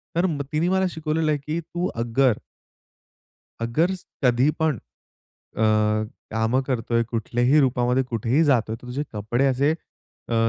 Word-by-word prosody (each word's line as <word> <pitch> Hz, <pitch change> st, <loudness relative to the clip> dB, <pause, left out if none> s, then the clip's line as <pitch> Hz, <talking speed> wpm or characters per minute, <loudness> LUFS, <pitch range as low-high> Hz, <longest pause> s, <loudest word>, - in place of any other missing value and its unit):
तर 170 Hz, +2 st, +2 dB
म 155 Hz, -6 st, -1 dB
तिने 160 Hz, +3 st, +1 dB
मला 190 Hz, 0 st, +2 dB
शिकवलेलं 160 Hz, -1 st, -1 dB
आहे, 150 Hz, -, +1 dB
की 155 Hz, +2 st, -1 dB
तू 175 Hz, +2 st, -3 dB
अगर 120 Hz, 0 st, +2 dB, 1.2 s
अगर 155 Hz, +11 st, +1 dB, 0.3 s
कधीपण 140 Hz, +4 st, +2 dB, 0.8 s
अ, 110 Hz, -, +1 dB, 0.7 s
कामं 110 Hz, +4 st, +1 dB
करतोय, 115 Hz, -2 st, 0 dB
कुठल्याही 120 Hz, +5 st, +2 dB
रूपामध्ये, 125 Hz, 0 st, +2 dB
कुठेही 125 Hz, +5 st, +1 dB
जातोय, 120 Hz, -6 st, +2 dB
तर 125 Hz, +2 st, -13 dB
तुझे 135 Hz, +4 st, -3 dB
कपडे 110 Hz, +5 st, 0 dB
असे 135 Hz, +3 st, +2 dB, 0.6 s
अ, -, -, -1 dB
130 Hz, 130 wpm, -24 LUFS, 120-155 Hz, 1.2 s, तर